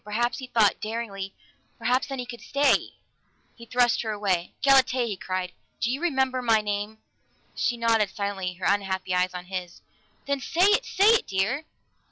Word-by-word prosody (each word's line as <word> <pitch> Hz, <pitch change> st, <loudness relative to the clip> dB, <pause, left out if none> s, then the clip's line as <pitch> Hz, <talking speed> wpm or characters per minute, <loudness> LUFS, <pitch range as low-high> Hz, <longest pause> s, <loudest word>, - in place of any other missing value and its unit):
Perhaps, 230 Hz, +4 st, -1 dB
he 260 Hz, -, -7 dB
thought 220 Hz, -5 st, +2 dB
daringly, 215 Hz, -3 st, -5 dB, 0.4 s
perhaps 255 Hz, +2 st, +1 dB
then 270 Hz, -1 st, -5 dB
he 250 Hz, -, -4 dB
could 240 Hz, -1 st, -9 dB
stay! 285 Hz, +1 st, +1 dB, 0.6 s
He 235 Hz, -1 st, -13 dB
thrust 245 Hz, 0 st, +2 dB
her 225 Hz, -, -4 dB
away. 195 Hz, -4 st, -1 dB
"Galatea!" 265 Hz, -2 st, +4 dB
he 215 Hz, -4 st, -3 dB
cried. 185 Hz, -1 st, -4 dB, 0.3 s
"Do 235 Hz, -, 0 dB
you 270 Hz, +4 st, -3 dB
remember 265 Hz, -6 st, +1 dB
my 225 Hz, -3 st, +4 dB
name?" 210 Hz, +1 st, -3 dB, 0.6 s
She 240 Hz, -, -1 dB
nodded 225 Hz, -3 st, +2 dB
silently, 195 Hz, -2 st, -3 dB
her 185 Hz, -, -6 dB
unhappy 190 Hz, -2 st, 0 dB
eyes 180 Hz, 0 st, +1 dB
on 180 Hz, 0 st, -6 dB
his. 180 Hz, -2 st, -6 dB, 0.4 s
"Then 280 Hz, 0 st, -1 dB
say 330 Hz, +7 st, 0 dB
it! 420 Hz, -, +2 dB
Say 400 Hz, +3 st, +4 dB
it, 460 Hz, -, +2 dB
dear!" 210 Hz, +10 st, -1 dB
225 Hz, 175 wpm, -26 LUFS, 195-255 Hz, 0.6 s, Galatea